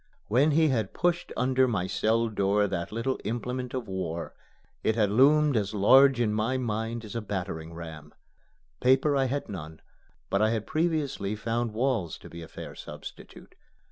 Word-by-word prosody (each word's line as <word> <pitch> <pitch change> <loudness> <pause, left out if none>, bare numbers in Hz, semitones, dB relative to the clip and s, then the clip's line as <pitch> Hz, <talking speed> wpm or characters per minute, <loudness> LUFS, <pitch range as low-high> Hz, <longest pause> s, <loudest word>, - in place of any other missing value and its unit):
When 130 +8 +4
he 155 +1 +4
had 110 -7 -1
pushed 175 0 0
under 130 0 +3
my 100 -7 0
cell 115 +4 +1
door 105 -1 +1
that 95 -4 -3
little 115 +4 -2
implement 125 +2 -3
of 125 -3 -4
war, 85 -3 -4 0.5
it 110 - +2
had 105 -3 +2
loomed 145 +5 +5
as 105 -1 0
large 130 +6 +6
in 110 -3 +1
my 110 +5 0
mind 115 -1 -3
as 105 - -9
a 115 - -1
battering 90 -6 -4
ram. 80 -3 -9 0.7
Paper 135 +3 +3
I 135 -1 +2
had 140 +3 -2
none; 80 -5 -7 0.5
but 100 - +2
I 110 - +4
had 110 -2 -1
previously 155 - -1
found 115 +1 -2
walls 115 - 0
to - - -13
be 85 - -8
a 80 - -8
fair - - -9
substitute. - - -11
115 Hz, 170 wpm, -28 LUFS, 100-130 Hz, 0.7 s, large